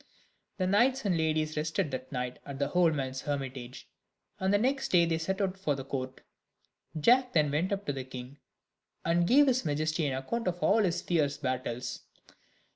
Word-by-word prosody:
The 185 - 0
knights 240 +7 +3
and 190 -3 +2
ladies 155 -1 0
rested 155 +1 -1
that 130 0 -5
night 125 -2 -3
at 140 -1 -7
the 140 0 -1
old 175 -3 +3
man's 130 -2 -3
hermitage, 135 -4 -5 0.5
and 190 0 +1
the 205 - +5
next 270 +5 0
day 170 -2 +4
they 165 -1 0
set 190 +4 -2
out 190 -1 -1
for 150 -7 0
the 135 -1 -6
court. 130 -1 -5 0.8
Jack 250 - +4
then 150 -3 +3
went 165 +7 0
up 200 0 -2
to 145 - -1
the 135 -1 -4
king, 130 +2 -9 0.7
and 170 +1 +2
gave 285 +7 +6
his 255 -2 +2
majesty 155 0 0
an 130 -1 -1
account 230 - -3
of 175 -1 0
all 220 +2 +4
his 175 -3 0
fierce 145 -5 +1
battles. 125 -3 -3
155 Hz, 190 wpm, -30 LUFS, 135-190 Hz, 0.8 s, gave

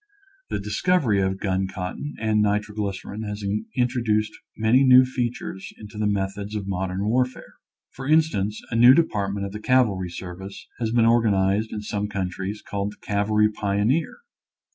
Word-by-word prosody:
The - - -1
discovery 105 - +1
of 95 0 0
gun 95 -1 0
cotton 95 +11 -5
and 110 -1 +2
nitroglycerin 105 0 -2
has 105 -1 -5 0.3
introduced 120 -4 +1 0.3
many 110 +5 +4
new 130 -1 +7
fea 125 -2 -1
tures 95 -5 -8
into 105 0 -10
the 105 - +1
methods 100 +1 -2
of 105 -2 -3
modern 95 0 -2
warfare. 125 +3 -1 0.4
For 135 0 -8
instance, 145 -10 +1
a - - -2
new 120 +3 +8
department 100 -10 0
of 100 - -6
the 105 - -6
cavalry 110 -7 +2
service 90 +2 -8
has 115 -2 -1
been 115 -1 +3
organized 110 -2 +2
in 105 - -5
some 105 -1 -2
countries 95 +1 -4
called 100 0 -3
the - - -22
cavalry 105 +1 +2
pioneer. 105 - 0
105 Hz, 155 wpm, -24 LUFS, 100-115 Hz, 0.4 s, new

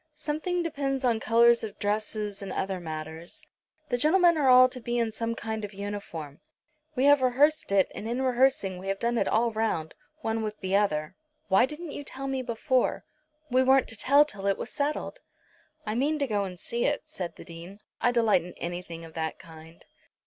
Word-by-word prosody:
Something 310 +4 -2
depends 275 -4 -2
on 235 -3 +2
colours 235 +1 +4
of 215 - -6
dress 210 +2 -1
and 205 -2 -4
other 190 0 -2
matters. 160 0 -7 0.4
The 245 -2 0
gentlemen 340 +4 +5
are 285 -4 +2
all 255 0 +8
to 255 0 -6
be 240 +1 -2
in 230 -2 0
some 230 +1 -2
kind 220 -1 -4
of 205 -1 -7
uniform. 195 -8 -6 0.6
We 255 - +1
have 285 -1 +6
rehearsed 275 +2 +2
it, 195 -1 +3
and 220 - -6
in 240 +2 -1
rehearsing 250 -7 +2
we 190 - -8
have 195 0 -1
done 235 +2 0
it - - +1
all 230 +1 +2
round, 215 -8 -1 0.3
one 225 -3 -1
with 215 -1 -4
the 190 +1 -1
other." 155 -7 0 0.3
"Why 195 +6 +5
didn't 305 +2 -8
you 290 - -6
tell 270 0 -7
me 270 -1 -1
before?" 250 +1 0 0.5
"We 255 +1 +4
weren't 265 0 +4
to 225 - -5
tell 280 +7 +5
till 200 -9 -5
it 195 - +2
was - - -6
settled." 300 +11 -2 0.7
"I 215 - -2
mean 285 +7 +1
to 285 - 0
go 205 -5 0
and 180 -2 -8
see 235 +6 -3
it," 290 0 0
said 190 - -6
the - - -12
Dean. 170 +3 -10 0.2
"I 245 - +3
delight 225 -6 +3
in 180 0 -10
anything 170 -1 -6
of 160 - -13
that 160 -1 -3
kind." 160 0 -14
225 Hz, 200 wpm, -27 LUFS, 195-265 Hz, 0.7 s, all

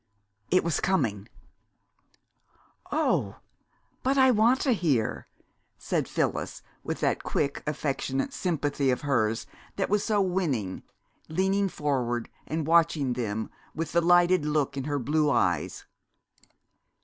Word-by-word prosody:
It 185 - +3
was 170 -2 0
coming! 115 - 0 1.6
"Oh, - - +1 0.7
but 270 +2 +1
I 260 -1 +6
want 235 +3 +4
to 270 - +2
hear!" 150 - 0 0.5
said - - -1
Phyllis, - - -2 0.2
with - - -4
that - - +1
quick, 140 -2 -1
affectionate 135 -2 -2
sympathy 145 -5 0
of 125 - +1
hers 115 -6 0 0.3
that 195 - -2
was 210 -1 +2
so 215 -2 +1
winning, 165 - -1 0.5
leaning 190 +4 +1
forward 125 -7 -1 0.2
and 160 -1 -2
watching 160 -5 +3
them 110 -3 -3 0.2
with 160 0 -3
the 170 - +3
lighted 175 0 +4
look 150 -2 0
in 135 -1 -3
her 145 -1 -1
blue 150 +3 +1
eyes. 90 - 0
150 Hz, 125 wpm, -27 LUFS, 130-185 Hz, 1.6 s, I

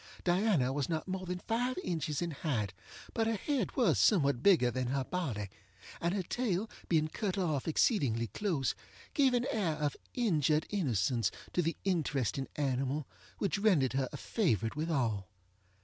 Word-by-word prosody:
Diana 175 - +2
was 145 +1 -1
not 160 +1 -2
more 185 0 -3
than 180 0 -2
five 240 +6 -1
inches 155 -2 -1
in 170 - -2
height, 120 - -2 0.4
but 225 -1 +1
her 225 - +1
head 255 0 -1
was 225 - +3
somewhat 140 - +4
bigger 155 -9 +5
than 125 +1 -2
her 135 +1 0
body, 125 - -3 0.5
and 170 +3 +1
her 195 - -1
tail 215 -1 -1 0.2
being 155 -2 +3
cut 195 +4 -2
off 160 -7 0
exceedingly 140 - +2
close, 145 - -1 0.4
gave 270 -4 +4
an 240 0 +1
air 190 -8 +1
of 150 -2 -1 0.2
injured 155 - +2
innocence 120 - +1 0.2
to 180 - +2
the 165 0 -1
interesting 140 - 0
animal 135 +1 -1 0.3
which 200 -1 0
rendered 175 - +3
her 135 -1 0
a - - -6
favorite 115 - 0
with 155 +3 -2
all. 115 - 0
160 Hz, 165 wpm, -33 LUFS, 135-195 Hz, 0.5 s, bigger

